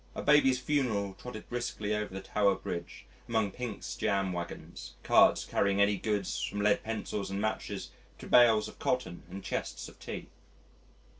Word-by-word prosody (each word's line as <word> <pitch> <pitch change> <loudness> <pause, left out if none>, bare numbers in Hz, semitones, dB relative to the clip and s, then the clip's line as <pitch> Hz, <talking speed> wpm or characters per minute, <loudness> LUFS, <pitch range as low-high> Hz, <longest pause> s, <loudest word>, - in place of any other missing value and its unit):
A - - -4
baby's 140 -3 +5
funeral 125 -8 0
trotted 110 +2 -9
briskly 120 -3 -2
over 105 -1 -3
the 95 +1 -5
Tower 100 0 +2
Bridge 85 -2 -6 0.2
among 110 -3 +1
Pink's 120 -1 -5
jam 95 -2 0
waggons, 85 -1 -7
carts - - +5
carrying 100 0 +1
any 100 0 +4
goods 100 -1 -1
from 105 - -2
lead 105 0 +3
pencils 110 -2 -3
and 100 0 -3
matches 110 +1 -3 0.3
to - - -10
bales 115 -3 +6
of - - -12
cotton 125 -9 -1
and 95 +2 -7
chests - - -3
of - - -15
tea. - - -7
105 Hz, 160 wpm, -31 LUFS, 100-115 Hz, 0.3 s, bales